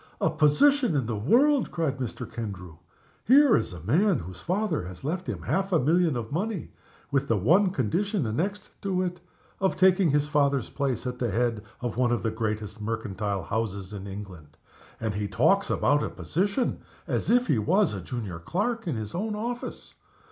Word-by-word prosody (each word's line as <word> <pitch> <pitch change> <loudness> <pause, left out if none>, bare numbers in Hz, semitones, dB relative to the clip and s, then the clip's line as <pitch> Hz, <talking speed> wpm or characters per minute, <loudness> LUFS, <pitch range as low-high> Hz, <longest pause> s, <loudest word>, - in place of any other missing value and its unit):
"A - - +2
position 170 - +4
in 135 -4 +1
the 115 0 -2
world!" 250 - +3
cried 145 -5 -2
Mr. 125 -3 -4
Kendrew. 90 -7 -7 0.5
"Here 270 0 +6
is - - 0
a 90 -3 -9
man 175 - +3
whose 90 +1 -8
father 190 -1 0
has 90 -1 -10
left 170 +6 -3
him - - -4
half 195 +1 0
a 175 - +4
million 160 0 +2
of 115 -2 -5
money 195 +3 -3 0.4
with 140 0 +1
the 115 - +2
one 175 - +4
condition 180 - 0
annexed 185 - -2
to 185 -2 0
it 180 -1 -4 0.4
of 190 -1 +1
taking 185 -2 +5
his 145 +1 +2
father's 140 -4 +1
place 135 -3 -2
at 125 -1 -4
the 120 - 0
head 115 0 0 0.2
of 120 -2 -3
one 125 -1 +2
of 120 - 0
the 115 - 0
greatest 110 -1 -3
mercantile 105 -3 -3
houses 100 -2 -3
in 100 -1 -6
England. 95 -7 -9 0.4
And 110 -2 -2
he 105 0 -2
talks 195 - +2
about 145 0 +2
a - - -2
position, 200 - -1 0.3
as - - -1
if 245 +1 +4
he 125 - +2
was 185 - +2
a 100 - -4
junior 100 -4 -5
clerk 210 - -2
in 160 - -1
his 110 -2 -5
own 210 +4 -2
office! 240 +3 -5
140 Hz, 185 wpm, -27 LUFS, -, 0.5 s, Here